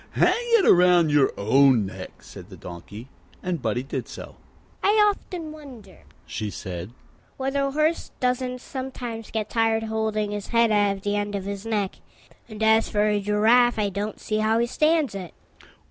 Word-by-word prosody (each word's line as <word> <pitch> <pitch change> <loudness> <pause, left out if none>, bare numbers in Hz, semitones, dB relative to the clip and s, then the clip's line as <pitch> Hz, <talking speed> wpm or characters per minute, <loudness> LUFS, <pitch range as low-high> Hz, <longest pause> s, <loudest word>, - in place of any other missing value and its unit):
"Hang - - +4 0.2
it 400 - +2
round 175 -3 +5
your 145 -2 +4
own 125 +1 +4
neck," 95 - -9
said - - -12
the - - -11
Donkey, 100 +7 -10 0.4
and 180 -5 -2
Buddie 120 +2 -1
did 135 - -5
so. - - -10 0.5
"I 405 - +3
often 360 -5 -4
wonder," 255 - -13 0.3
she 105 -2 -4
said, 90 -2 -6 0.5
"whether 270 +1 -1
a 275 - 0
horse 310 +4 0
doesn't 250 0 -1
sometimes 250 -5 -6
get 220 -2 -3
tired 225 -1 +1
holding 220 -1 -1
his 205 -1 -5
head 230 -1 +3
out 205 -1 +2
at 195 - -15
the 205 0 -1
end 205 0 -2
of 195 - -3
his 200 +2 -5
neck. 205 -4 -1 0.5
And 215 0 -5
as 220 0 +4
for 210 0 +1
a 210 -1 +1
giraffe, 225 +4 +3
I 210 -2 +1
don't 205 +2 -4
see 215 - -2
how 220 +1 +2
he 235 - +2
stands 305 0 +1
it." 185 -4 -7
215 Hz, 175 wpm, -24 LUFS, 190-245 Hz, 0.5 s, round